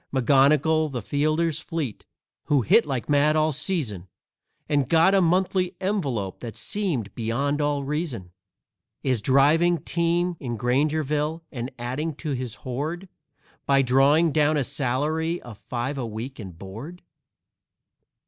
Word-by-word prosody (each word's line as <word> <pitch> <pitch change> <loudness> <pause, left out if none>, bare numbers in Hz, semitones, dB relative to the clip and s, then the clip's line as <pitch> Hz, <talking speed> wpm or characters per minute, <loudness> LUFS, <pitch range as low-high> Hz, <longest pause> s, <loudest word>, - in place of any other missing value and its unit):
McGonnigal, 145 +4 +3
the 125 -5 -4
fielder 155 +6 +1
fleet, 155 - -5 0.4
who 140 -4 +2
hit 225 - +4
like 130 -4 -3
mad 145 +1 +3
all 155 0 +2
season, 140 - -2 0.6
And 145 -3 +1
got 165 +4 +5
a 195 - +5
monthly 180 +1 +1
envelope 140 - -2
that 115 -2 -7
seemed 155 - -2
beyond 135 +6 -1
all 145 -1 0
reason, 135 - -3 0.7
Is 130 -5 +1
driving 150 +8 +4
team 170 +1 0
in 120 -4 -4
Grangerville, 150 +5 0
and 125 -2 -5
adding 135 +6 -3
to 150 0 -5
his 125 -4 -3
hoard 155 +9 -4 0.6
By 135 -1 +4
drawing 140 +6 +4
down 150 0 +2
a 140 - +1
salary 150 +5 -1
of 115 -4 -11
five 125 +3 -4
a 120 - -3
week 115 +5 -6
and 95 -6 -9
board. 115 - -9
145 Hz, 135 wpm, -25 LUFS, 125-160 Hz, 0.7 s, got